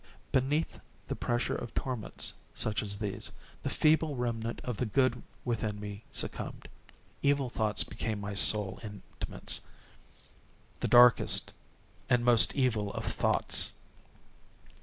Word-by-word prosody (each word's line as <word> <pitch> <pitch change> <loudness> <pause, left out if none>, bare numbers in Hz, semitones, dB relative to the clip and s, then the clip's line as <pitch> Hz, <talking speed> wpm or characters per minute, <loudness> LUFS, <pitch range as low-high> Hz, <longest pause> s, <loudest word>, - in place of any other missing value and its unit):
_ - - -31
Beneath 140 +5 0 0.3
the - - -3
pressure 120 0 -1
of 115 - -6
torments 125 -5 -2 0.2
such 110 -2 -1
as 100 -1 -3
these, 100 -2 -3 0.3
the - - -2
feeble 155 -1 +2
remnant 115 -2 -3
of 125 -4 -4
the 125 - -1
good 130 +4 +1 0.2
within 110 -3 -2
me 105 0 -7
succumbed. - - -3 0.5
Evil 140 -3 +1
thoughts 110 -3 +3
became 110 0 -4
my 100 0 -5
sole 100 0 +5
intimates—the 105 -2 -5 1.3
darkest 120 0 +5 0.6
and 120 -1 +3
most 120 -2 +5
evil 115 -7 0
of - - -5
thoughts. - - +1
115 Hz, 120 wpm, -30 LUFS, 105-125 Hz, 1.3 s, sole